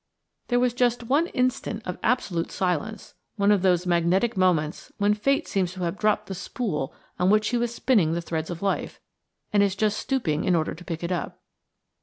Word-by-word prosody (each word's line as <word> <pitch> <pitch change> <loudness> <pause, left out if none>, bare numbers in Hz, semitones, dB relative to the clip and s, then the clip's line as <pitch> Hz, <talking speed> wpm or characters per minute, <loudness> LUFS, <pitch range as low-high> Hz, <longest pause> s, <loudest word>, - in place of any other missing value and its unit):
There 245 0 +2
was 250 -1 +2
just 245 -1 +1
one 285 +8 +2
instant 255 - -1
of 180 - -5
absolute 195 -8 0
silence, 185 +4 -2 0.2
one 200 0 +3
of 205 -3 +3
those 180 -1 +2
magnetic 180 +6 +2
moments 175 -5 +1
when 205 0 +3
Fate 275 +7 +1
seems 185 -2 -1
to 185 - -8
have 170 +2 -2
dropped 215 0 +2
the 195 - -6
spool 170 - -3 0.3
on 180 +1 +3
which 215 +1 +4
she 245 - 0
was 235 0 -1
spinning 205 -13 +2
the 170 - 0
threads 160 -1 -3
of 175 +1 -6
a - - -1
life, 195 - -2 0.5
and 205 - +5
is 200 -2 +2
just 215 +1 +1
stooping 180 - -1
in 180 - +2
order 160 -2 0
to 175 - -11
pick 165 -1 -5
it 170 - -2
up. 180 - -3
195 Hz, 205 wpm, -25 LUFS, 175-230 Hz, 0.5 s, and